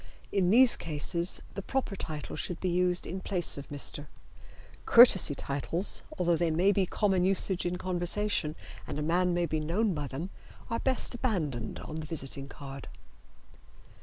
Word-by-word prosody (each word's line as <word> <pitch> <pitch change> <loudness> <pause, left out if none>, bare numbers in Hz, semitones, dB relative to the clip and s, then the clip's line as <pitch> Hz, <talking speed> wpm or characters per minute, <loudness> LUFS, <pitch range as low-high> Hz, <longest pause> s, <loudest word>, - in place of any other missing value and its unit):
In 190 -3 +1
these 245 +4 +6
cases 170 +2 +1
the 200 - -5
proper 255 -1 -3
title 155 -5 -6
should 180 - -4
be 185 - -2
used 180 0 0
in 190 - -5
place 180 -3 +2
of 140 - -11
"Mr." 145 0 -1 0.8
Courtesy 195 - +6
titles, 145 +8 +1 0.2
although 175 -2 +2
they 170 0 0
may 175 +5 +2
be 195 -2 +1
common 195 -2 +1
usage 190 -1 +1
in 175 - -2
conversation 180 -2 -1 0.3
and - - -5
a 150 - -2
man 180 +3 +1
may 175 0 +1
be 155 -1 -2
known 185 +7 0
by 150 -3 -4
them, 155 +9 -6 0.4
are 230 - -1
best 260 -1 0
abandoned 165 - -3
on 155 - -7
the 155 -1 -6
visiting 140 -3 -3
card. 140 -1 -10
175 Hz, 165 wpm, -29 LUFS, 150-195 Hz, 0.8 s, these